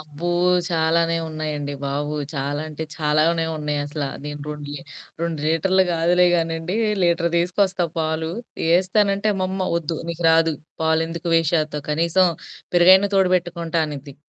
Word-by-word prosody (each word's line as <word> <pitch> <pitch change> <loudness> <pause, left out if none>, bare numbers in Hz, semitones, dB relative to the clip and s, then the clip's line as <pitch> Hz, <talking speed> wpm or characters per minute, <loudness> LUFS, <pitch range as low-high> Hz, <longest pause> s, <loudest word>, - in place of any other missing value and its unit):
అబ్బో! 155 +2 -6 0.4
చాలానే 165 0 +1
ఉన్నాయండి 150 -2 -4
బాబు. 145 +2 -2 0.2
చాలా 140 +1 -2
అంటే 155 +1 -5
చాలానే 160 +1 +1
ఉన్నాయసలా. 145 -1 -3 0.2
నేను 150 0 -6
రొండు 150 -1 -6
లీ - - -5 0.4
రొండు 170 -2 -2
లీటర్లు 185 +4 +3
గాదులే 175 +2 +3
గానండి. 165 +2 -1 0.3
లీటర్ 170 -1 +2
తీసుకొస్తా 180 +1 +1
పాలు. 160 0 -1 0.5
ఏస్తానంటే 200 +2 +1
అమ్మమ్మ 190 0 -2
వద్దు 165 -1 -3
నీకు 170 0 -5
రాదు 165 0 +4 0.3
పాలెందుకు 165 +1 0
వేస్ట్ 165 -1 +2
చేత్తావు. 150 -2 -2
కనీసం 170 +4 +3 0.5
పెరుగైనా 185 +3 +6
తోడు 190 -2 +3
బెట్టుకుంటా 170 -2 -1
అనిద్ది. 140 -2 -8
165 Hz, 130 wpm, -21 LUFS, 150-175 Hz, 0.5 s, పెరుగైనా